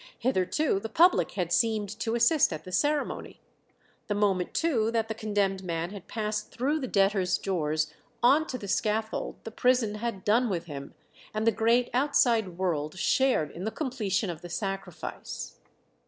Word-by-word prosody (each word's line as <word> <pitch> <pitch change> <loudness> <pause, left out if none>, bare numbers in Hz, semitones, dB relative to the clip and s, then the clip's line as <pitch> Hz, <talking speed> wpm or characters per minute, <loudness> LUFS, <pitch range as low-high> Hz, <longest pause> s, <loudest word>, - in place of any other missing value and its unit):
Hitherto 235 - +1
the 225 - -6
public 345 +10 +4
had 175 -3 -1
seemed 220 -3 +2
to 230 0 -1
assist 235 +4 +4
at 155 - -5
the 185 - -9
ceremony; 295 +8 -1 0.7
the 205 - -1
moment 195 -3 +1
too 245 -10 +2
that 225 -1 0
the - - -1
condemned 205 -3 -1
man 170 0 -3
had 200 -3 -9
passed 210 -1 -3
through 285 +6 0
the 260 - -3
debtors' 195 -3 +2
door 160 -6 -1 0.5
on 290 +6 +5
to 255 - -4
the 205 - -8
scaffold 220 +2 -1
the 225 - -7
prison 245 -2 +2
had 210 -3 -4
done 235 +3 +3
with 175 -4 -2
him, 140 -4 -8 0.4
and 215 +1 0
the 230 - +5
great 230 +3 +2
outside 235 -8 +2
world 165 -3 -1
shared 190 - +2
in 175 - -7
the 220 - 0
completion 220 - -1
of 165 -1 -9
the 175 - -9
sacrifice. 195 +2 -5
215 Hz, 170 wpm, -28 LUFS, 185-240 Hz, 0.7 s, on